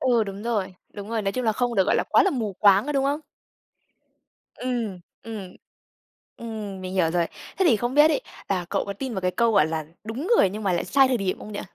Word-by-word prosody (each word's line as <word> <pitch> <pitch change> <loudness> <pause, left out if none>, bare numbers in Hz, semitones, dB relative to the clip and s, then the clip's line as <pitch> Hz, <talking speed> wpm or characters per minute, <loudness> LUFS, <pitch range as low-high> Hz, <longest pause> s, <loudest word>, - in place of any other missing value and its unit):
ờ, 240 -4 +3
đúng 200 0 -7
rồi, 210 -6 -2 0.2
đúng 205 0 -7
rồi, 225 -1 -1
nói 195 -1 -1
chung 255 - -2
là 220 - +3
không 245 +2 -1
được, 190 -3 +4
gọi - - +3
là, - - +1
quá - - +6
là 390 - +2
mù 225 - -2
quáng, 200 +2 +6
có 295 - -1
đúng 275 -1 +1
không? 290 +3 0 1.3
Ừm, 235 -7 -3 0.2
ừm. 210 -5 -7 0.8
Ừm, 215 -4 -6
mình 185 0 -6
hiểu 175 -4 +2
rồi. 170 0 +1 0.3
Thế 380 - +3
thì 240 -9 +5
không 240 +4 -2
biết 295 +1 +7
ấy - - +1 0.3
là 185 -3 0
cậu - - 0
có 200 - -4
tin 255 +4 -5
vào 190 - -2
cái 185 - +1
câu 230 +4 +2
gọi 195 -7 +5
là 160 -1 -3 0.2
"Đúng 245 - -4
người 190 - +4
nhưng 215 +3 -6
mà 195 - +1
lại 175 - 0
sai 270 +7 +4
thời 255 - +2
điểm" 195 -4 -2
không 215 - -9
nhỉ? 205 - -4
215 Hz, 250 wpm, -25 LUFS, 190-245 Hz, 1.3 s, biết